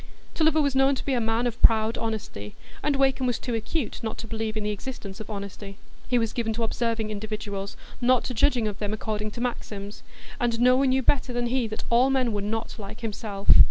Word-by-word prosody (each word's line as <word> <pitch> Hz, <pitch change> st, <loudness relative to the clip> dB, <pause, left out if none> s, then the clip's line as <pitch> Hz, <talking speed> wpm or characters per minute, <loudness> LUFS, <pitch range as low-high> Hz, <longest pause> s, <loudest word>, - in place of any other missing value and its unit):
Tulliver 315 Hz, -1 st, +3 dB
was 280 Hz, -2 st, +1 dB
known 270 Hz, +1 st, +4 dB
to -, -, -6 dB
be 275 Hz, -, +1 dB
a 245 Hz, -, +2 dB
man 225 Hz, +2 st, +1 dB
of 240 Hz, -1 st, -2 dB
proud 220 Hz, 0 st, +5 dB
honesty, 205 Hz, -, -4 dB, 0.3 s
and 295 Hz, -1 st, +1 dB
Wakem 270 Hz, -1 st, +2 dB
was 245 Hz, -, +1 dB
too 245 Hz, -, -4 dB
acute 225 Hz, +4 st, -2 dB
not 220 Hz, -1 st, -3 dB
to 225 Hz, -, -6 dB
believe 220 Hz, -1 st, -3 dB
in 215 Hz, -, -2 dB
the 210 Hz, -, 0 dB
existence 205 Hz, -2 st, -6 dB
of 220 Hz, -, -8 dB
honesty. 200 Hz, -1 st, -6 dB, 0.3 s
He 250 Hz, -, +2 dB
was 225 Hz, -2 st, 0 dB
given 225 Hz, -2 st, -1 dB
to 230 Hz, +1 st, -2 dB
observing 225 Hz, -1 st, -1 dB
individuals, 205 Hz, -2 st, -4 dB, 0.2 s
not 250 Hz, 0 st, +4 dB
to 255 Hz, -, -3 dB
judging 240 Hz, -1 st, +3 dB
of 205 Hz, -1 st, -4 dB
them 210 Hz, 0 st, -2 dB
according 215 Hz, 0 st, -2 dB
to 235 Hz, -, -7 dB
maxims, 210 Hz, -4 st, -4 dB, 0.4 s
and 235 Hz, -2 st, +1 dB
no 250 Hz, +1 st, +6 dB
one 270 Hz, +1 st, +3 dB
knew 260 Hz, 0 st, +2 dB
better 260 Hz, -1 st, +2 dB
than 240 Hz, 0 st, 0 dB
he 245 Hz, -1 st, +1 dB
that 215 Hz, -, -5 dB
all 245 Hz, +3 st, +5 dB
men 255 Hz, -4 st, +2 dB
were 205 Hz, -, -1 dB
not 225 Hz, +3 st, -3 dB
like 200 Hz, +2 st, -8 dB
himself. 210 Hz, -2 st, 0 dB
225 Hz, 225 wpm, -26 LUFS, 215-250 Hz, 0.4 s, no